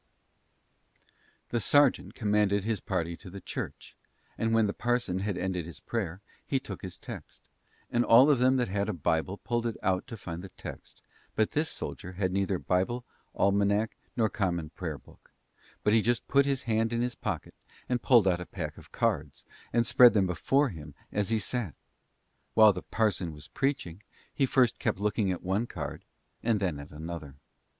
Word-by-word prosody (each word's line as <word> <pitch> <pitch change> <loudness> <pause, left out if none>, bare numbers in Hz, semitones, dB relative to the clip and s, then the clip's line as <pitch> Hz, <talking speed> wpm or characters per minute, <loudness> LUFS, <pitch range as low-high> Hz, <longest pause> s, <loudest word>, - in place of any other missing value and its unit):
The 120 - 0
sergeant 145 +6 +3
commanded 105 -2 +2
his 110 -1 -1
party 85 -3 -2
to 95 - -11
the 100 +2 -8
church, - - -6 0.4
and 115 0 0
when 115 -1 +4
the 100 - -1
parson 120 -6 0
had 100 0 -2
ended 90 -3 -2
his 85 - -10
prayer, 95 -5 -3 0.2
he 135 - 0
took - - -8
his 95 -3 -7
text; - - -10 0.5
and 120 0 +3
all 120 +2 +8
them 130 -3 +4
that 125 -2 +1
had 100 +1 -1
a - - 0
Bible 85 +3 0
pulled 120 +1 -1
it 115 - -3
out 95 +4 +1
to 115 -3 -7
find 85 -3 -6
the 95 - -9
text, - - -10 0.3
but 110 - +2
this 155 +2 0
soldier 95 - -5
had 95 0 -1
neither 95 0 0
Bible, 95 +9 0 0.3
Almanack, 100 +2 +2 0.2
nor 115 -2 +4
Common 85 -7 -2
Prayer 85 -5 -4
book; - - -20 0.5
but 105 - +3
he 110 - +5 0.3
put 140 0 +4
his 135 -2 0
hand 115 0 +1
in 120 0 0
his 125 0 -1
pocket - - -4 0.3
and 125 -1 0
pulled 115 -6 +5
out 90 -1 +2
a 90 - -7
pack 80 -5 -5
of - - -16
cards, 70 -2 -1 0.3
and 120 0 +2
spread 120 -2 +7
them 100 -3 +3
before 135 - +2
him 75 -6 -9 0.2
as 105 -1 0
he 115 - +2
sat. 110 - -2 0.8
While 110 -2 +8
the 90 - -5
parson 100 -7 0
was 75 0 -11
preaching, 120 - -2 0.3
he 135 - +2
first 125 -3 +3
kept - - 0
looking 105 0 +1
at 90 - -4
one 100 +6 0
card 75 - -6 0.4
and 115 -2 +2
then 90 -7 -1
at 70 - -9
another. 80 -2 -7
100 Hz, 180 wpm, -29 LUFS, 90-115 Hz, 0.8 s, all